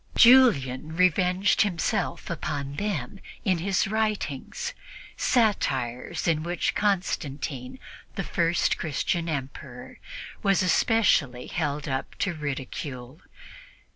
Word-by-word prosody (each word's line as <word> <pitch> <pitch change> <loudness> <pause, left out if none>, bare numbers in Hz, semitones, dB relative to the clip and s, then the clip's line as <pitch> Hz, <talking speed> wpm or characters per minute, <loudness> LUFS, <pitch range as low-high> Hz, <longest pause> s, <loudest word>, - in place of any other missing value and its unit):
Julian 160 - +5
revenged 185 +4 +3
himself 200 -1 -1
upon 140 -4 -4
them 195 -4 -3 0.3
in 185 -4 +2
his 190 +3 +1
writings 210 -10 -2 0.4
satires 135 - 0
in 160 -2 +2
which 175 +2 -1
Constantine, 150 -9 -2 0.4
the - - -2
first 170 0 +1
Christian 165 +2 -1
Emperor, 135 -3 -6 0.4
was 195 -1 +3
especially 170 - +2
held 150 -3 -2
up 130 -1 -3
to 195 - -1
ridicule. 140 -2 -6
165 Hz, 95 wpm, -26 LUFS, 140-195 Hz, 0.4 s, Julian